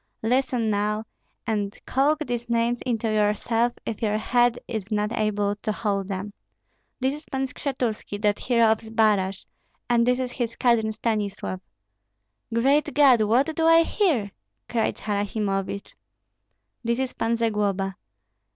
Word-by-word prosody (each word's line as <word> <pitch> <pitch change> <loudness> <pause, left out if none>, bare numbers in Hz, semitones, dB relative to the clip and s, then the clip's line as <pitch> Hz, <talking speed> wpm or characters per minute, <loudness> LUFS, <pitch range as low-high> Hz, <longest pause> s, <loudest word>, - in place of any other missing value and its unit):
"Listen 245 -1 +1
now, 210 +1 0 0.4
and 205 -2 -2
calk 300 +4 +1
these 240 -2 -4
names 235 +1 +1
into 230 -2 0
yourself 220 +2 +1
if 225 - -4
your 215 -1 +1
head 240 +2 +2
is 220 -2 -5
not 210 0 0
able 210 -2 0
to 215 +1 -2
hold 200 -3 -1
them. 195 +1 -4 0.7
This 265 +1 +1
is 300 +1 -9
Pan 265 -2 -2
Skshetuski, 250 -7 -3
that 205 -1 +2
hero 235 -3 +3
of 220 - +1
Zbaraj; 215 -4 +1 0.4
and 235 0 +3
this 250 0 +3
is 255 -1 -2
his 235 -3 -3
cousin 235 -3 +2
Stanislav." 210 -4 -2 0.9
"Great 270 +6 +2
God! 270 -6 +6
what 250 +9 +2
do 325 0 +2
I 330 0 +7
hear?" 310 - +1 0.4
cried 230 -2 0
Harasimovich. 200 -1 -2 0.9
"This 235 0 0
is 260 -1 -2
Pan 230 +1 0
Zagloba." 205 -4 0
225 Hz, 140 wpm, -25 LUFS, 210-245 Hz, 0.9 s, I